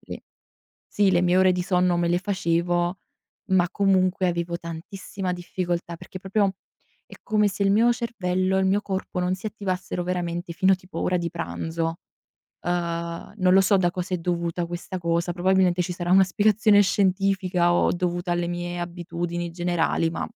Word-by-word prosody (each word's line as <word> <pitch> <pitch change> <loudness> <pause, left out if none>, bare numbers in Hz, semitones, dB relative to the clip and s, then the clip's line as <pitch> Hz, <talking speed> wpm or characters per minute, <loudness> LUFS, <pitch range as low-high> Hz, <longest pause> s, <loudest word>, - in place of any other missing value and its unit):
le - - -9 0.6
sì 200 -2 +2
le 175 -1 +3
mie 180 +1 +3
ore 185 -1 +5
di 180 - -1
sonno 180 -1 +2
me 170 0 +1
le 175 +1 +2
facevo, 175 -1 0 0.5
ma 180 -2 +4
comunque 190 -2 +2
avevo 170 0 -2
tantissima 180 +3 -6
difficoltà, 175 -1 -3
perché 185 - -10
proprio 195 +1 0 0.5
è - - -13
come 210 -1 +2
se 200 +1 -3
il 195 - +3
mio 230 +4 +4
cervello 190 -6 -1
e - - +2
il 190 - +2
mio 195 +2 +2
corpo 190 -2 -4
non 180 +1 0
si 185 - -12
attivassero 185 -4 -3
veramente 175 -1 -3
fino 190 +3 +4
a - - +3
tipo 180 -2 -10
ora 180 - +1
di 170 -1 -2
pranzo. 165 -1 -3 0.7
Ehm, 170 +1 -3
non 185 -3 +3
lo 195 - +7
so 195 +1 +4
da 180 -2 +2
cosa 180 +1 -3
è - - -1
dovuta 170 0 -2
questa 175 +2 -6
cosa, 170 0 0
probabilmente 180 0 +2
ci 180 +1 -3
sarà 175 0 -4
una 190 +1 +7
spiegazione 205 +2 +4
scientifica 190 -2 +1
o - - +3
dovuta 175 0 -1
alle 175 0 0
mie 175 0 -4
abitudini 175 0 -4
generali, 175 -1 0
ma - - -3
180 Hz, 175 wpm, -24 LUFS, 175-190 Hz, 0.7 s, lo